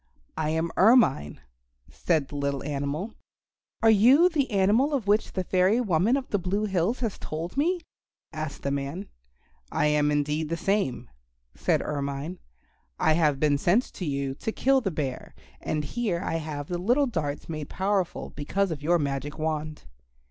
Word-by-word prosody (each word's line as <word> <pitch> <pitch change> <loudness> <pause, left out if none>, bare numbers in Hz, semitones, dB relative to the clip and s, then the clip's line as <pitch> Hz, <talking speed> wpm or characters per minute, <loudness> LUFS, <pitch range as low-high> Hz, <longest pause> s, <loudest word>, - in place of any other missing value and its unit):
"I 155 -1 -1
am 160 +1 -1
Ermine," 185 - +4 0.5
said 155 -5 -1
the - - -8
little 140 -1 -2
animal. 145 +8 -3 0.7
"Are 225 - +7
you 255 - +6
the 290 -6 0
animal 220 +8 +3
of 250 -7 -2
which 205 +2 +1
the 185 - -1
fairy 185 +5 +2
woman 210 +3 +2
of 270 - -5
the 205 - 0
Blue 195 +4 -1
Hills 195 +5 0
has 225 -5 -2
told 165 +3 -5
me?" 345 +6 +1 0.5
asked 155 -2 -5
the 140 - -1
man. 140 +8 -4 0.6
"I - - +1
am 150 0 +3
indeed 150 +1 0
the 170 - -1
same," 165 - -1 0.5
said - - 0
Ermine. 140 +4 -4 0.6
"I 160 - +4
have 155 -4 +2
been 145 -1 +2
sent 195 - +2
to 185 - -5
you 140 -2 -2
to 220 - -4
kill 270 +3 +2
the 195 - -1
Bear, 140 -6 -4 0.3
and 150 -1 -2
here 185 +3 -2
I 165 - -1
have 150 -2 -5
the 175 -1 -3
little 245 +10 +3
darts 155 - -3
made 155 -2 -5
powerful 190 -1 -1
because 190 +6 -1
of 150 -3 -4
your 170 +4 +3
magic 140 -1 -3
wand." 155 -1 -3
165 Hz, 170 wpm, -26 LUFS, 145-205 Hz, 0.7 s, Are